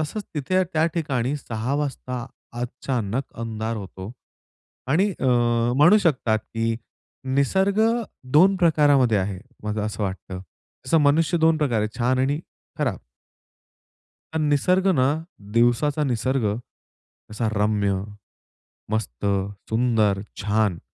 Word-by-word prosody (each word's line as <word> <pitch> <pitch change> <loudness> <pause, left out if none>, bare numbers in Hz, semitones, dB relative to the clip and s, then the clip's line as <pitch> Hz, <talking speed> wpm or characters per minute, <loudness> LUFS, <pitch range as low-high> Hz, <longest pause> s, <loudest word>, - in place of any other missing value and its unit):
तसंच 200 +7 -3
तिथे 150 +4 -2
या 185 - +5
त्या 155 0 +2
ठिकाणी 140 -5 -1
6 120 -1 -3
वाजता 135 -4 -3 0.3
अचानक 125 -1 -2 0.2
अंधार 115 0 -3
होतो 95 0 -8 0.8
आणि, 180 +10 +3
अ, - - -1 0.5
म्हणू 170 +9 +7
शकतात, 130 - +1
की 115 +1 -2 0.6
निसर्ग 190 +9 +2 0.5
2 185 +6 +6
प्रकारामध्ये 145 - +4
आहे, 95 -1 -2 0.2
मला 105 0 -2
असं 105 0 -3
वाटतं. 95 -1 -5 0.4
जसं 145 +6 +3
मनुष्य 155 +4 +3
2 160 0 +3
प्रकारे 130 -8 +1
आहे, 110 +1 -5
छान 125 +2 +2
आणि 140 +3 +1 0.4
खराब. 125 -10 0 1.4
पण 160 -1 0
निसर्ग 180 +7 +2
ना 130 -4 +3 0.5
दिवसाचा 140 +6 +3
निसर्ग 130 -1 0 0.8
असा 110 +1 -1
रम्य, 105 -1 +1 1.0
मस्त, 100 - -2 0.4
सुंदर, 110 -4 +2 0.2
छान 105 -3 +1
125 Hz, 115 wpm, -23 LUFS, 110-150 Hz, 1.4 s, म्हणू